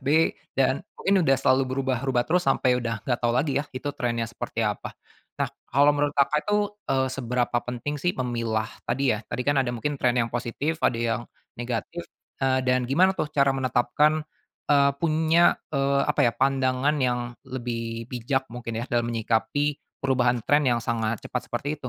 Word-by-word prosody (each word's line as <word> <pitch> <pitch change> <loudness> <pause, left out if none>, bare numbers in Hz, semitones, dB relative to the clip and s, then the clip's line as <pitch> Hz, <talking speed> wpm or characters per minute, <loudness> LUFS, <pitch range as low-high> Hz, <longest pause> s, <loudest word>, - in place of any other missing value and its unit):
B 160 +4 +3 0.2
dan 135 0 +2 0.2
mungkin 195 -1 +2
udah 135 0 +5
selalu 130 +1 +3
berubah-ubah 130 -1 0
terus 175 +2 +1
sampai 125 -1 +2
udah 115 -3 -4
nggak 120 -2 0
tau 120 - +1
lagi 140 +1 +1
ya - - -5
itu 130 - -4
trendnya 115 -2 -1
seperti 115 - -4
apa. - - -3 0.4
Nah - - 0 0.2
kalau 145 +3 +5
menurut 145 0 0
Kakak 140 +2 +3
itu, 210 0 +2 0.3
eee, 130 0 +1
seberapa 125 -2 -1
penting 125 +4 -3
sih 175 +3 +1
memilah 115 -3 -1 0.2
tadi 125 0 +2
ya 110 - -2
tadi 125 +2 -3
kan 145 +1 +2
ada 130 - -1
mungkin 140 +5 -3
trend 125 0 +2
yang 115 - -3
positif 125 +7 -2
ada 115 - +2
yang, 115 0 0 0.3
negatif, 120 +8 -4 0.4
eee, 130 0 +3
dan 125 0 +3
gimana 185 +8 +4
tuh 150 - -2
cara 140 -1 +3
menetapkan, 135 +4 +2 0.4
eee, 140 -1 +5
punya, 160 +1 +3 0.2
eee, 140 -1 +1
apa - - 0
ya 120 - +2
pandangan 135 +2 +1
yang 125 -2 +1 0.3
lebih 115 -2 -5
bijak 130 +2 -1
mungkin 115 -1 -6
ya - - -3
dalam 120 -1 +1
menyikapi 120 +5 0 0.2
perubahan 125 -3 +2
trend 145 +3 +3
yang 120 -1 +2
sangat 115 -1 -1
cepat - - -4
seperti 145 - -3
itu? 130 - -6
130 Hz, 180 wpm, -25 LUFS, 120-145 Hz, 0.4 s, udah